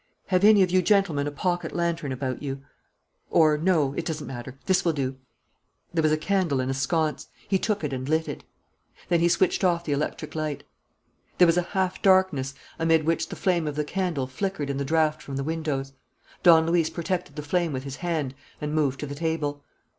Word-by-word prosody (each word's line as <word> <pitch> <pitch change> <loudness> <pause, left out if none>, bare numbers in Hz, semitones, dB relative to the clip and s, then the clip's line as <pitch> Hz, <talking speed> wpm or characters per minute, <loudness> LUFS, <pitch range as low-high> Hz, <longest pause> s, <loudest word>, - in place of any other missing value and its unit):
Have 185 0 +2
any 210 -2 +7
of 180 - 0
you 185 0 +4
gentlemen 175 -7 +2
a - - -2
pocket 175 +4 -2
lantern 170 -4 -1
about 130 -1 -3
you? 135 -1 -5 0.7
Or, 155 -2 +5
no, 155 -4 +2
it 170 - -3
doesn't 160 -2 -4
matter. 130 0 -7
This 190 - +2
will 170 - +2
do." 135 -2 -2 0.8
There 165 - +2
was 155 -1 +3
a 155 - +3
candle 175 -5 0
in 130 +1 -1
a - - 0
sconce. 155 +3 -1 0.2
He 190 - +2
took 210 -3 -1
it 145 -2 -2
and 130 +1 -4
lit 160 +1 +1
it. - - -6 0.7
Then 170 -1 +3
he 170 +1 +3
switched 175 +2 +2
off 170 -2 +2
the 150 - -2
electric 145 +2 -2
light. 155 -3 -3 0.7
There 180 - +7
was 165 -1 +4
a - - +4 0.2
half 185 -1 0
darkness, 185 -9 +3 0.2
amid 165 -1 +3
which 165 +1 0
the - - -6
flame 175 -5 +1
of 150 - -3
the 150 - 0
candle 175 -5 -1
flickered 145 +2 -3
in 135 - -3
the 140 - -2
draught 155 +1 +1
from 140 -3 -7
the 135 - -2
windows. 145 -3 -3 0.5
Don 165 -2 +7
Luis 165 -1 +2
protected 175 -3 -3
the 150 - -5
flame 170 +2 0
with 130 -2 -4
his 135 -1 -6
hand 160 -7 -2 0.3
and 150 0 -3
moved 140 -4 +1
to - - -2
the 140 - -6
table. 145 -2 -2
160 Hz, 210 wpm, -26 LUFS, 140-175 Hz, 0.8 s, any